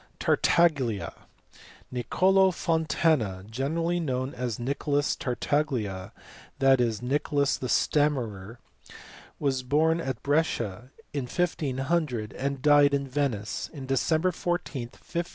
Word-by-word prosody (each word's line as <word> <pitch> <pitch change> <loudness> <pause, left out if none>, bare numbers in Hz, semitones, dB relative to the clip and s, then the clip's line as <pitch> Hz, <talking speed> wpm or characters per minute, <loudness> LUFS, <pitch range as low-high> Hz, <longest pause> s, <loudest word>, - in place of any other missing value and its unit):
Tartaglia. 140 -11 +2 0.8
Piccolo 190 +9 +3 0.2
Montana, 155 - +1
generally 160 +9 -1
known 130 -4 -2
as 120 -3 -3
Nicholas 140 +3 0
Tartaglia, 120 -7 -2 0.5
that 135 -1 +4
is, 115 -1 -1
Nicholas 140 +2 +1
the 125 - -5
stammerer, 120 -10 0 0.8
was 135 -3 0
born 160 +6 +2
at 130 -6 -4
Brescia 125 -7 0 0.2
in 140 -3 -2
1500 140 - -1
and 135 0 -3
died 145 -1 +6
at 140 - 0
Venice 130 -6 -2
on 135 -2 -6
December 155 +7 +1
14, 165 -8 -3
1557. 170 0 -5
140 Hz, 105 wpm, -27 LUFS, 125-155 Hz, 0.8 s, died